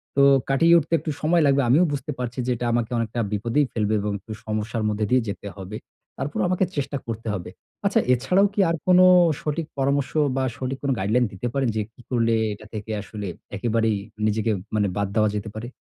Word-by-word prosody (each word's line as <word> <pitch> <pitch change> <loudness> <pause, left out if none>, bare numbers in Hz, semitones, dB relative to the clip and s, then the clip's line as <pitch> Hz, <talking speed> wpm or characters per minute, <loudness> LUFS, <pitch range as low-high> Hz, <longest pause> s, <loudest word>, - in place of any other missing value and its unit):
তো 140 - +4 0.3
কাটিয়ে 165 +5 +5
উঠতে 165 0 -1
একটু 155 - -3
সময় 165 +2 +3
লাগবে। 140 0 +4
আমিও 150 +8 +5
বুঝতে 145 +2 -3
পারছি 125 0 -4
যে, - - +1
এটা 120 - -4
আমাকে 120 -1 0
অনেকটা 115 0 -2
বিপদেই 115 +8 +1
ফেলবে 110 -1 0
এবং 105 +1 -2
একটু 105 - -12
সমস্যার 110 +1 -2
মধ্যে 105 0 -1
দিয়েই 125 -1 +3
যেতে 100 0 -6
হবে। 100 +2 -6 0.4
তারপরও 145 +2 -2
আমাকে 185 +1 +2
চেষ্টা 140 0 -2
করতে 115 0 -5
হবে। 95 -4 -5 0.4
আচ্ছা, - - +3
এছাড়াও 180 +11 +3
কী 205 - -4
আর 165 - +1
কোন 180 0 +6 0.4
সঠিক 155 +2 -2
পরামর্শ 140 0 +1 0.2
বা, 135 - 0
সঠিক 130 +1 -3
কোন 140 - +1
গাইডলাইন 110 +6 +2
দিতে 100 +5 -4
পারেন? 135 -2 +1
যে, 110 - +1
কী 125 - -17
করলে 115 -2 +2 0.2
এটা 105 +1 -12
থেকে 110 0 -5
আসলে 105 0 -7 0.3
একেবারেই 110 0 +1 0.3
নিজেকে 110 +1 0 0.2
মানে 105 -1 +2
বাদ 100 0 0
দেওয়া 110 -1 +3
যেতে 105 +1 -4
পারে? 110 +2 -5
120 Hz, 200 wpm, -24 LUFS, 110-140 Hz, 0.4 s, কোন